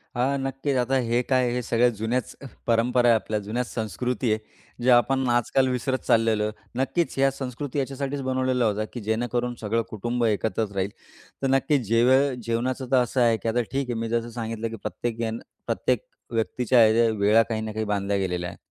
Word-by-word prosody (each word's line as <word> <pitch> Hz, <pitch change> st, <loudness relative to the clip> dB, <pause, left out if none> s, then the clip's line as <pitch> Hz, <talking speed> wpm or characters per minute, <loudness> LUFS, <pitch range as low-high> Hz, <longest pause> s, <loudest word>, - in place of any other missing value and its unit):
हां, 130 Hz, +3 st, +1 dB
नक्कीच. 135 Hz, +1 st, -2 dB
आता 125 Hz, +2 st, +1 dB
हे 120 Hz, +1 st, +3 dB
काय 130 Hz, -2 st, +3 dB
हे 125 Hz, -, -1 dB
सगळ्या 120 Hz, +1 st, +3 dB
जुन्यांच 120 Hz, +4 st, -2 dB, 0.3 s
परंपरा 120 Hz, +1 st, +3 dB
आहे, 115 Hz, -, +6 dB
आपल्या 110 Hz, -1 st, -1 dB
जुन्यांच 115 Hz, +4 st, -3 dB
संस्कृती 120 Hz, +3 st, -1 dB
आहे, 110 Hz, -, -2 dB, 0.4 s
जे 125 Hz, -, +3 dB
आपण 130 Hz, +2 st, +4 dB
आजकाल 120 Hz, +2 st, +2 dB
विसरत 130 Hz, +1 st, -1 dB
चाललेलो 115 Hz, -2 st, +3 dB
आहे. 105 Hz, -, -1 dB, 0.3 s
नक्कीच 170 Hz, +5 st, 0 dB
ह्या 135 Hz, 0 st, +4 dB
संस्कृती 135 Hz, +1 st, -4 dB
याच्यासाठीच 140 Hz, +1 st, -3 dB
बनवलेला 130 Hz, -1 st, 0 dB
होत्या, 110 Hz, 0 st, 0 dB
की 120 Hz, -, -5 dB
जेणेकरून 120 Hz, +3 st, -1 dB
सगळं 115 Hz, +2 st, 0 dB
कुटुंब 120 Hz, +3 st, -1 dB
एकत्रच 110 Hz, 0 st, 0 dB
राहील. 95 Hz, 0 st, 0 dB, 0.5 s
तर 135 Hz, -, +1 dB
नक्कीच 135 Hz, +1 st, +2 dB
जेवे 120 Hz, +4 st, +5 dB, 0.2 s
जेवणाचं 125 Hz, +3 st, -2 dB
तर 130 Hz, -, +5 dB
असं 125 Hz, +1 st, -1 dB
आहे, 115 Hz, -2 st, +4 dB
की 110 Hz, +2 st, -2 dB
आता 120 Hz, +2 st, +1 dB
ठीक 135 Hz, -1 st, -2 dB
आहे, -, -, 0 dB
मी 115 Hz, 0 st, -3 dB
जसं 115 Hz, 0 st, -1 dB
सांगितलं, 115 Hz, -1 st, -4 dB
की 115 Hz, -, -6 dB
प्रत्येक 120 Hz, -2 st, -3 dB
जण 115 Hz, 0 st, -2 dB, 0.3 s
प्रत्येक -, -, 0 dB, 0.3 s
व्यक्तीच्या 115 Hz, +1 st, +3 dB
या 115 Hz, +1 st, +4 dB
वेळा 105 Hz, +3 st, +5 dB
काही 110 Hz, -1 st, -3 dB
ना 110 Hz, 0 st, -4 dB
काही 110 Hz, 0 st, -2 dB
बांधल्या 100 Hz, -1 st, 0 dB
गेलेल्या 90 Hz, -2 st, -2 dB
आहे. -, -, -11 dB
120 Hz, 190 wpm, -25 LUFS, 110-130 Hz, 0.5 s, आहे